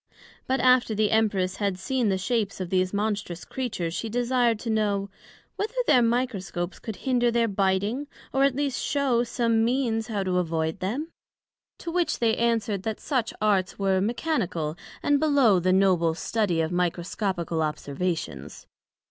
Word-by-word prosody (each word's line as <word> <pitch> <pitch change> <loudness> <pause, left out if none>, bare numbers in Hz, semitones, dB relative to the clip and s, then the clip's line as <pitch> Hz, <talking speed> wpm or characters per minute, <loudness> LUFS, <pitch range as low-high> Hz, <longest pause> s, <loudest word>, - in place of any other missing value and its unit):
But 265 +1 +1
after 250 -3 +4
the 210 0 +2
Empress 200 -4 +1
had 200 -3 -1
seen 245 +3 0
the 190 - +1
shapes 205 0 -1
of 185 -2 -4
these 185 -1 +2
monstrous 205 -4 -2
Creatures, 205 -10 -3
she 225 - -3
desir'd 245 0 +1
to 230 - -2
know, 200 -2 0 0.5
Whether 435 +4 -3
their 260 - +5
Microscopes 230 -7 -1
could 220 - -6
hinder 245 -2 +3
their 235 0 +2
biting, 200 +7 0 0.3
or 270 0 +3
at 275 -2 +3
least 280 -2 -1
shew 270 -5 +1
some 230 -2 +1
means 230 -2 0
how 205 -3 -2
to 180 -1 +1
avoid 160 0 -1
them? 245 - -3 0.7
To 335 - -6
which 350 0 0
they 225 -2 +2
answered, 225 -4 0
That 220 +2 -3
such 255 -6 -1
Arts 195 -4 +1
were 195 -1 +1
mechanical 195 - -1 0.3
and 290 -1 +3
below 275 -10 +4
the 185 +1 +1
noble 185 -4 +3
study 185 -3 0
of 160 +1 -1
Microscopical 175 -1 -1
observations. 150 - -3
210 Hz, 155 wpm, -26 LUFS, 185-245 Hz, 0.7 s, their